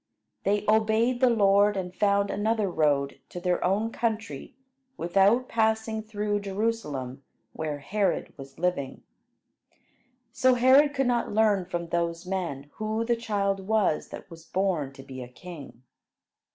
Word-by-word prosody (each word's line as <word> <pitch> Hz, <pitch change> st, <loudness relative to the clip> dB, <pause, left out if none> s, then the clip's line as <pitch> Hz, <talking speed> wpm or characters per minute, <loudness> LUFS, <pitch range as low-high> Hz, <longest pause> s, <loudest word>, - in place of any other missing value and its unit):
They 205 Hz, +1 st, +1 dB
obeyed 220 Hz, +3 st, +2 dB
the 255 Hz, -1 st, +5 dB
Lord, 205 Hz, -2 st, +4 dB
and 180 Hz, -1 st, -4 dB
found 200 Hz, +1 st, +2 dB
another 215 Hz, 0 st, 0 dB
road 140 Hz, -4 st, +1 dB
to 175 Hz, -, -7 dB
their 180 Hz, 0 st, 0 dB
own 205 Hz, +5 st, +1 dB
country 220 Hz, -, -3 dB, 0.4 s
without 195 Hz, +8 st, +3 dB
passing 220 Hz, -1 st, 0 dB
through 210 Hz, -1 st, -2 dB
Jerusalem 195 Hz, -, -3 dB, 0.3 s
where 155 Hz, -2 st, -3 dB
Herod 195 Hz, +8 st, -1 dB
was 135 Hz, -1 st, -12 dB
living. 160 Hz, -6 st, -2 dB, 1.3 s
So 255 Hz, 0 st, +3 dB
Herod 270 Hz, +4 st, +5 dB
could 270 Hz, -1 st, +1 dB
not 245 Hz, -1 st, 0 dB
learn 210 Hz, -3 st, +3 dB
from 170 Hz, -2 st, -4 dB
those 170 Hz, 0 st, -1 dB
men 165 Hz, -7 st, -4 dB
who 220 Hz, +1 st, -2 dB
the 235 Hz, 0 st, +2 dB
child 200 Hz, -4 st, -2 dB
was 215 Hz, -8 st, +1 dB
that -, -, -9 dB
was 165 Hz, -1 st, -11 dB
born 175 Hz, -7 st, -1 dB
to 135 Hz, -1 st, -12 dB
be 130 Hz, -1 st, -9 dB
a 125 Hz, -, -7 dB
king. 140 Hz, -2 st, -11 dB
200 Hz, 140 wpm, -27 LUFS, 170-220 Hz, 1.3 s, the